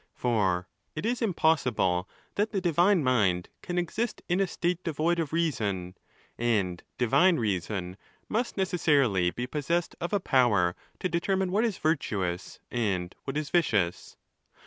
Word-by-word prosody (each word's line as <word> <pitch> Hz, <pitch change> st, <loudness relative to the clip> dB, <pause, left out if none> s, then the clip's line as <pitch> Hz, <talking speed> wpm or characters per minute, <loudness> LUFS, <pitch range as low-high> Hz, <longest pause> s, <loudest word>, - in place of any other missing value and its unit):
For 95 Hz, -7 st, +1 dB, 0.3 s
it 155 Hz, -, -4 dB
is 240 Hz, +2 st, 0 dB
impossible 125 Hz, -, +1 dB, 0.2 s
that 210 Hz, +2 st, 0 dB
the 200 Hz, -, 0 dB
divine 175 Hz, 0 st, +3 dB
mind 100 Hz, -9 st, +2 dB
can 175 Hz, -, -4 dB
exist 210 Hz, +7 st, -2 dB
in 180 Hz, +1 st, +1 dB
a 195 Hz, -, +2 dB
state 175 Hz, 0 st, -2 dB
devoid 165 Hz, +2 st, 0 dB
of 160 Hz, -3 st, -2 dB
reason; 105 Hz, -, -1 dB, 0.4 s
and 100 Hz, -7 st, 0 dB, 0.2 s
divine 170 Hz, +9 st, +4 dB
reason 95 Hz, -3 st, -2 dB, 0.3 s
must 230 Hz, +2 st, -1 dB
necessarily 140 Hz, -, +2 dB
be 120 Hz, +7 st, -4 dB
pos 145 Hz, +2 st, -5 dB
sessed 170 Hz, 0 st, +1 dB
of 175 Hz, -, -2 dB
a 205 Hz, -, +2 dB
power 115 Hz, -, +3 dB, 0.3 s
to -, -, +1 dB
determine 185 Hz, +2 st, 0 dB
what 210 Hz, +5 st, +2 dB
is 220 Hz, -5 st, -1 dB
virtuous 100 Hz, -, -1 dB
and 95 Hz, -7 st, -1 dB
what 135 Hz, +1 st, -3 dB
is 150 Hz, -2 st, -3 dB
vicious. 105 Hz, -, +1 dB
145 Hz, 145 wpm, -28 LUFS, -, 0.4 s, divine